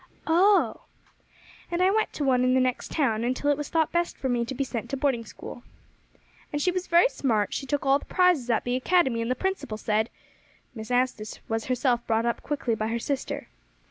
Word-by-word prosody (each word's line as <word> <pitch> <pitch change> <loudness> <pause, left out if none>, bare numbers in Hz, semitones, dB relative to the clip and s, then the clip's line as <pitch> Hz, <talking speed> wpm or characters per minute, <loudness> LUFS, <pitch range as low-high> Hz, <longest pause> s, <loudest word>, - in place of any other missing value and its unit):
"Oh!" 380 +5 +3 0.8
"And 345 - -2
I 370 +1 +4
went 435 +1 +1
to 295 - -3
one 255 -2 +3
in 255 0 +3
the - - +4
next 255 -1 -1
town 230 -8 +1
until 255 +4 +1
it - - +2
was 295 0 -5
thought 320 -2 +1
best 345 0 -1
for 265 - -2
me 240 -1 +1
to 265 - -5
be 275 - 0
sent 240 -4 -5
to 275 - -2
boarding 260 -4 0
school." 240 - -10 0.9
"And 295 - -1
she 360 +5 +2
was 365 0 -3
very 345 +6 +5
smart; 220 - 0
she 270 - -4
took 290 +1 -1
all 275 +1 +4
the - - -13
prizes 360 -9 +2
at 230 - +2
the 245 0 -1
academy, 260 -4 +2
and 230 - -2
the 255 - +1
principal 380 - -3
said 220 +1 0 0.3
" - - -34
Miss 220 -1 -8
Anstice 245 -4 0
was 225 0 -2
herself 250 -1 +1
brought 225 0 +1
up 235 - -1
quickly 275 -5 -2
by 215 0 -1
her 230 +1 -1
sister. 270 +3 -3
260 Hz, 220 wpm, -26 LUFS, 235-300 Hz, 0.9 s, very